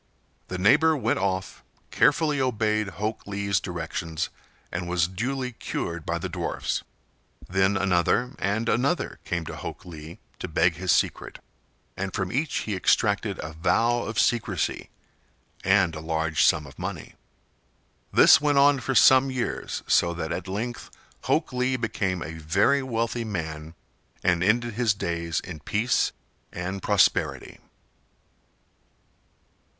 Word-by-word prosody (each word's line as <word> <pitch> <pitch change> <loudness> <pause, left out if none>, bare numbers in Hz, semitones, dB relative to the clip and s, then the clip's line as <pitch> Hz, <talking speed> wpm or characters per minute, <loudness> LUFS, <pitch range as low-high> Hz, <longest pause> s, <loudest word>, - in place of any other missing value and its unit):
The 90 - -4
neighbor 150 - +4
went 125 - 0
off, 95 -1 -2 0.3
carefully 150 -1 +3
obeyed 110 -4 0
Hok 110 +1 -3
Lee's 100 -2 0
directions, 80 -2 -4 0.4
and 85 0 -3
was 90 -2 +2
duly 125 +7 -3
cured 85 -7 -5
by - - 0
the - - -4
dwarfs. - - -3 0.7
Then 95 +2 +2
another 100 +7 +1
and 105 +4 -1
another 130 +10 0
came 85 -1 -2
to - - -6
Hok - - -7
Lee 80 +1 -10 0.2
to - - -4
beg 85 +1 +2
his 90 -1 0
secret, - - 0 0.6
and 95 0 -4
from 95 -2 -2
each 140 +4 -1
he 105 - -3
extracted 90 - +1
a 80 +1 -6
vow 95 +9 +2
of 110 -1 -5
secrecy 110 -8 0 0.7
and 95 -3 +3
a 80 - -6
large 80 -1 0
sum 75 -1 +3
of 70 - -14
money. - - -6 1.0
This - - +7
went 145 -1 +2
on 140 0 +5
for 130 +2 -2
some 130 +2 +6
years, 130 -2 -3
so 85 0 +3
that 80 -2 -4
at - - -4
length 115 +5 -4 0.4
Hok - - +1
Lee 125 +1 0
became 95 -6 -2
a 80 +2 -7
very 100 - +2
wealthy 115 -2 -2
man 80 -6 -5 0.5
and 90 -1 +2
ended 120 +3 +2
his 115 -2 +1
days 85 -3 -2
in 85 -4 -8
peace 105 - +1 0.4
and 95 +2 -4
prosperity. 100 -3 +1
100 Hz, 135 wpm, -25 LUFS, 85-120 Hz, 1.0 s, This